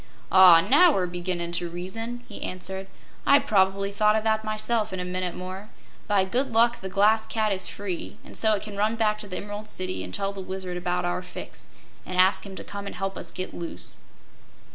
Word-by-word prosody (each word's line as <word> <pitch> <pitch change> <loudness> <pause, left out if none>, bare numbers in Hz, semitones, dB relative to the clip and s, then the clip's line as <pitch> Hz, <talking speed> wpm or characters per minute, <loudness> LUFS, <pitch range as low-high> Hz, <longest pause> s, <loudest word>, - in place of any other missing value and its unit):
"Ah, 180 -2 +9
now 335 - +6
we're 190 -9 +1
beginnin' 175 -1 -3
to 175 0 -2
reason," 225 +8 -5
he 205 - -9
answered. 190 +1 -4 0.4
"I'd 280 0 +5
probably 195 -4 +2
thought 210 +1 +3
o' 220 - +2
that, 220 0 +1
myself, 215 0 -1
in 185 - -4
a 180 - -3
minute 180 -1 -3
more. 185 +3 -7 0.4
By 200 -3 +3
good 255 +7 -1
luck 235 +1 +3
the 190 - -5
Glass 215 +3 +3
Cat 215 -2 0
is 190 -1 -1
free, 190 -4 -5
an' - - -12
so 220 -1 +3
it 200 - -4
can 205 -2 -7
run 215 +2 +1
back 215 -2 +1
to 210 - -7
the 185 - -5
Emerald 205 +1 -6
City 185 - -3
an' 90 - -7
tell 195 - -2
the 195 - -6
Wizard 185 -1 -5
about 180 0 -1
our 175 +1 -1
fix, 180 - -9 0.4
an' 185 - -6
ask 190 +2 +4
him 195 - -9
to - - -7
come 200 0 -7
an' - - -5
help 195 +1 -3
us 170 - -7
get 185 +2 -5
loose." 170 -1 -6
195 Hz, 215 wpm, -26 LUFS, 185-215 Hz, 0.4 s, Ah